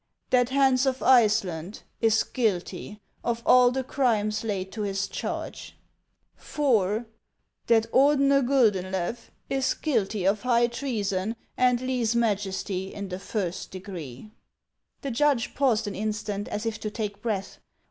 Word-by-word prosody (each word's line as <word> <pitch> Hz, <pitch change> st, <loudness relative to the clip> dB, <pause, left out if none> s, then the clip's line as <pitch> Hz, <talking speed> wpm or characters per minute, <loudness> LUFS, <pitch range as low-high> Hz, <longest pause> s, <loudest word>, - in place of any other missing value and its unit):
That 245 Hz, -1 st, +4 dB
Hans 265 Hz, -1 st, +3 dB
of 260 Hz, 0 st, -1 dB
Iceland 210 Hz, -7 st, +2 dB, 0.2 s
is 220 Hz, -1 st, +3 dB
guilty 205 Hz, -2 st, -2 dB, 0.2 s
of 235 Hz, -1 st, -2 dB
all 250 Hz, -1 st, +7 dB
the 260 Hz, +1 st, -2 dB
crimes 220 Hz, -5 st, 0 dB
laid 190 Hz, -4 st, -3 dB
to 220 Hz, -, -5 dB
his 195 Hz, -1 st, -1 dB
charge; -, -, -6 dB, 0.3 s
" -, -, -41 dB
IV. 225 Hz, -6 st, +1 dB, 0.6 s
That 225 Hz, -1 st, +4 dB
Ordener 275 Hz, 0 st, +4 dB
Guldeulew 205 Hz, -8 st, +1 dB, 0.3 s
is 270 Hz, -1 st, 0 dB
guilty 215 Hz, -, -1 dB
of 200 Hz, +2 st, +2 dB
high 240 Hz, -1 st, +3 dB
treason 225 Hz, -5 st, -2 dB, 0.2 s
and 250 Hz, -1 st, +3 dB
leze 250 Hz, -3 st, 0 dB
majesty 195 Hz, -4 st, -1 dB
in 200 Hz, -1 st, -6 dB
the 180 Hz, 0 st, -5 dB
first 190 Hz, -3 st, -3 dB
degree," 180 Hz, -, -8 dB, 0.7 s
The 275 Hz, -, -3 dB
judge 275 Hz, 0 st, +1 dB
paused 240 Hz, -5 st, +2 dB
an 205 Hz, -, -4 dB
instant 210 Hz, 0 st, -3 dB
as 210 Hz, +2 st, -4 dB
if 225 Hz, -1 st, -2 dB
to 215 Hz, -, -3 dB
take 210 Hz, -2 st, -5 dB
breath. 210 Hz, -4 st, -3 dB
220 Hz, 135 wpm, -26 LUFS, 200-250 Hz, 0.7 s, all